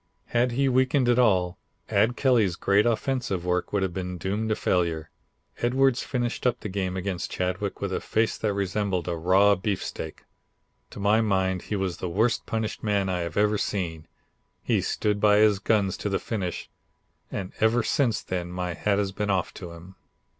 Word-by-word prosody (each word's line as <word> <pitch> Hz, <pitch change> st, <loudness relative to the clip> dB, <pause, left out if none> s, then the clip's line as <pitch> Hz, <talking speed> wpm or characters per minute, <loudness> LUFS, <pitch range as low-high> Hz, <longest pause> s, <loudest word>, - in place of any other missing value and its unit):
Had 120 Hz, +1 st, +2 dB
he 135 Hz, +2 st, +2 dB
weakened 130 Hz, 0 st, +2 dB
at 120 Hz, 0 st, +4 dB
all, 95 Hz, -7 st, +2 dB, 0.3 s
Ad 120 Hz, +2 st, +2 dB
Kelly's 115 Hz, -9 st, +3 dB
great 100 Hz, +5 st, +3 dB
offensive 115 Hz, -6 st, -1 dB
work 90 Hz, 0 st, 0 dB
would 100 Hz, -2 st, +1 dB
have 95 Hz, -2 st, -2 dB
been 90 Hz, -1 st, -4 dB
doomed 105 Hz, +5 st, -2 dB
to 110 Hz, -, +2 dB
failure. 85 Hz, -5 st, 0 dB, 0.5 s
Edwards 130 Hz, +1 st, +2 dB
finished 125 Hz, -1 st, -1 dB
up 125 Hz, 0 st, 0 dB
the 105 Hz, -, -5 dB
game 95 Hz, -1 st, -2 dB
against 95 Hz, -1 st, -3 dB
Chadwick 90 Hz, 0 st, -3 dB
with -, -, -2 dB
a -, -, -1 dB
face 110 Hz, 0 st, 0 dB
that 110 Hz, -, 0 dB
resembled 100 Hz, -2 st, -1 dB
a 85 Hz, -, -1 dB
raw 95 Hz, +5 st, +4 dB
beefsteak. 95 Hz, -5 st, -4 dB, 0.7 s
To -, -, -10 dB
my 105 Hz, +3 st, +3 dB
mind 95 Hz, -4 st, +1 dB
he 105 Hz, -, -4 dB
was 95 Hz, -3 st, -2 dB
the 90 Hz, -, -4 dB
worst 110 Hz, +7 st, +1 dB
punished 110 Hz, -1 st, -2 dB
man 100 Hz, -3 st, 0 dB
I 90 Hz, -1 st, -1 dB
have 85 Hz, -1 st, -4 dB
ever 105 Hz, 0 st, +3 dB
seen. 85 Hz, -6 st, -3 dB, 0.6 s
He -, -, +1 dB
stood 105 Hz, -1 st, 0 dB
by 105 Hz, -1 st, +5 dB
his 105 Hz, -2 st, +4 dB
guns 100 Hz, -2 st, +1 dB
to 105 Hz, -, -3 dB
the 95 Hz, -, +1 dB
finish, 95 Hz, -6 st, -4 dB, 0.6 s
and 95 Hz, -1 st, -4 dB
ever 110 Hz, +2 st, +3 dB
since 115 Hz, -1 st, +1 dB
then 90 Hz, -1 st, -3 dB
my 90 Hz, 0 st, -3 dB
hat 100 Hz, +3 st, 0 dB
has 100 Hz, -1 st, 0 dB
been 105 Hz, +1 st, -3 dB
off 95 Hz, -3 st, 0 dB
to 90 Hz, -3 st, -8 dB
him." 90 Hz, +3 st, -13 dB
100 Hz, 185 wpm, -26 LUFS, 90-110 Hz, 0.7 s, by